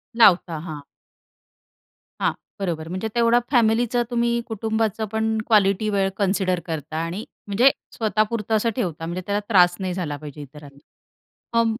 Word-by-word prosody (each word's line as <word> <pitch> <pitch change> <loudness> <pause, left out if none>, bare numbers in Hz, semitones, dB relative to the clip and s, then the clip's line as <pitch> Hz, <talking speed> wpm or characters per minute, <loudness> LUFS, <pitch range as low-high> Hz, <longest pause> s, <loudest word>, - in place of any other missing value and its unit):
लावता 185 -7 +5
हां. 155 -2 -7 1.4
हां, - - +3 0.3
बरोबर. 165 -5 -3
म्हणजे 185 +5 -3
तेवढा 235 0 +4
फॅमिलीचं, 240 0 +3
तुम्ही 235 0 +1
कुटुंबाचं 220 0 -1
पण 220 0 0
क्वालिटी 210 -1 +3
वेळ 195 -2 +1
कन्सिडर 190 -2 +1
करता 160 -1 -5
आणि 175 +6 -4 0.2
म्हणजे 235 +7 +5 0.3
स्वतःपुरतं 215 0 0
असं 220 +2 +2
ठेवता, 170 - -3
म्हणजे 175 +2 -4
त्याला 205 0 +1
त्रास 180 -4 +5
नाही 185 -2 -2
झाला 165 -6 -3
पाहिजे 150 0 -9
इतरांना. 145 0 -12 0.8
हां 230 0 +4
200 Hz, 135 wpm, -23 LUFS, 175-225 Hz, 1.4 s, लावता